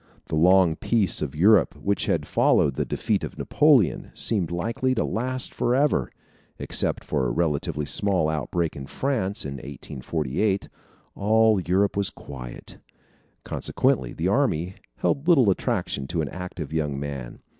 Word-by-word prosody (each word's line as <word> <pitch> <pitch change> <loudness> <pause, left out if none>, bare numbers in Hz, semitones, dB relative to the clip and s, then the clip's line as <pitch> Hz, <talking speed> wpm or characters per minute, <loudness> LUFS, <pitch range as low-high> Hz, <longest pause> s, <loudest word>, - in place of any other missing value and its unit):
The - - -1
long 90 0 +4
peace 110 -6 +2
of 75 -1 -3
Europe, 100 +6 +4
which 100 -1 -1
had - - 0
followed 70 - +3
the - - -2
defeat - - -1
of - - -6
Napoleon, 140 - +3
seemed 95 -8 0
likely 115 +9 -1
to - - 0
last 130 +3 -3
forever. 125 - +1 0.5
Except - - -1
for 70 -4 -1
a - - -1
relatively 75 0 -1
small 95 +1 +1
outbreak 80 +2 -2
in 70 -1 -7
France, 110 - -2
in 70 -1 -5
1848, 75 +7 -3 0.4
all 110 0 +3
Europe 95 +3 +1
was 100 -1 0
quiet. 60 -4 -10 0.6
Consequently, 65 -2 0
the - - -2
army 85 +4 +1 0.2
held 140 +3 -1
little 135 - +5
attraction 70 -6 -2
to 80 +2 -1
an 75 - -3
active 90 -4 -7
young 75 -4 -1
man. 70 -4 -6
90 Hz, 145 wpm, -25 LUFS, 70-110 Hz, 0.6 s, little